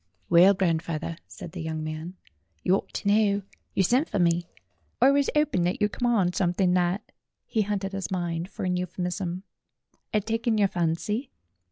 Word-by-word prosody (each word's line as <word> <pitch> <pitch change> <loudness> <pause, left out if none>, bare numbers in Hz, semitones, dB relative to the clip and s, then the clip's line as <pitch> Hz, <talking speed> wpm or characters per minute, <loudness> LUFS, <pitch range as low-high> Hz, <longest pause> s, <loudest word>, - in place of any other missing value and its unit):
"Well, 185 +4 +7
grandfawther," 165 -2 -1
said 170 - -9
the 180 - -6
young 160 -1 -3
man, 155 +3 -5 0.5
"you 180 - +3
ought 195 - 0
to - - -3
know. 205 -1 +3 0.3
You 190 - +3
sent 255 - +2
for - - -1
me. 170 -1 +2 0.5
I 270 - +6
was 280 0 +2
'oping 300 -11 +2
that 180 - 0
you'd 210 0 +2
come 245 -1 0
on 190 -6 +2
something 180 0 +2
that" 180 +3 0 0.3
he 220 - 0
hunted 200 -1 -2
his 195 -4 -4
mind 175 -1 -2
for - - -5
an 180 0 +1
euphemism 180 0 -3 0.7
"had 210 -1 0
taken 225 0 0
your 200 -2 +3
fancy." 185 - -1
185 Hz, 175 wpm, -26 LUFS, 175-210 Hz, 0.7 s, Well